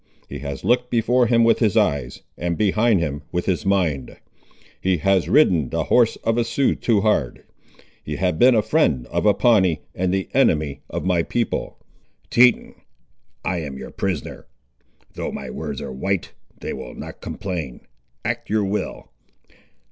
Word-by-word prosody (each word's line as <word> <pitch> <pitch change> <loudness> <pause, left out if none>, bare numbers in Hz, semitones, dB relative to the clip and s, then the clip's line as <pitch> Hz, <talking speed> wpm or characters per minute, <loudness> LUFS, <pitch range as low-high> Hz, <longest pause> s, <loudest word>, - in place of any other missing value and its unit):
He 70 - -7
has 70 -1 -6
looked 125 0 +2
before 120 +1 +2
him 115 0 +4
with 115 - +4
his 110 -2 +2
eyes, 70 - 0
and 85 -1 -2
behind 110 0 +3
him 75 -2 -3
with 90 0 -2
his 95 +1 -1
mind. 85 -10 0 0.6
He 95 -1 +1
has 95 +3 +1
ridden 90 - +4
the - - -1
horse 120 -2 +3
of 115 +1 +1
a - - +3
Sioux 125 +4 +1
too 110 -4 +1
hard; 105 +1 0 0.6
he 75 - -4
has 90 +3 0
been 125 +9 +5
the 110 - +3
friend 110 - +1
of - - +1
a 105 - +5
Pawnee, 95 - +3
and 90 0 -1
the 95 -2 -1
enemy 70 -3 +2
of - - -4
my 90 -2 +2
people." 120 +7 -2 0.5
"Teton, 125 0 +4 0.7
I 90 - 0
am 70 -4 -6
your - - -8
prisoner. 95 -7 -4 0.7
Though - - -4
my 65 -2 -6
words - - -5
are - - -6
white, 95 +7 -2 0.3
they - - -5
will - - -8
not - - -9
complain. 85 -10 -5 0.4
Act - - -3
your 105 -1 +1
will." 100 +2 -4
95 Hz, 165 wpm, -22 LUFS, 80-115 Hz, 0.7 s, been